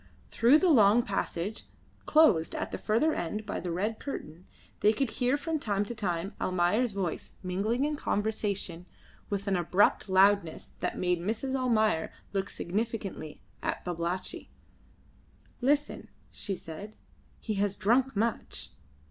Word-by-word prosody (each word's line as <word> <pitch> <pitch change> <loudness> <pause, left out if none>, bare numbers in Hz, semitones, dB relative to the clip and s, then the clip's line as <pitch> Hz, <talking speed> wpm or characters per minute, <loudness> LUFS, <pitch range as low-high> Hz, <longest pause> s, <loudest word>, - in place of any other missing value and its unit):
Through 245 +6 +6
the 360 +1 +3
long 220 -2 +6
passage, 200 0 -3 0.4
closed 215 - +4
at - - -3
the - - -4
further 235 +9 +2
end 210 +6 -3
by 205 - -3
the 180 - -4
red 205 +6 -1
curtain, 175 - -7 0.3
they 215 - +4
could 260 +1 -1
hear 250 +3 +1
from 315 +2 -2
time 205 -5 0
to 240 - -5
time 190 -4 -2
Almayer's 185 +7 +2
voice 190 -5 -3
mingling 210 +8 0
in 300 0 -1
conversation 200 - -2 0.4
with 200 -1 -2
an 195 - +2
abrupt 180 +3 +2
loudness 190 -3 +3
that - - -2
made 180 -1 +1
Mrs. 225 +8 -2
Almayer 220 -9 +2 0.2
look 195 0 -1
significantly 200 -5 -4 0.2
at - - -3
Babalatchi. 175 +1 -3 1.1
"Listen," 290 +3 0 0.2
she 195 - -3
said. 190 +6 -9 0.4
"He 220 - -3
has 200 -1 +1
drunk 245 +5 +2
much." 225 +2 -2
205 Hz, 140 wpm, -29 LUFS, 185-235 Hz, 1.1 s, Through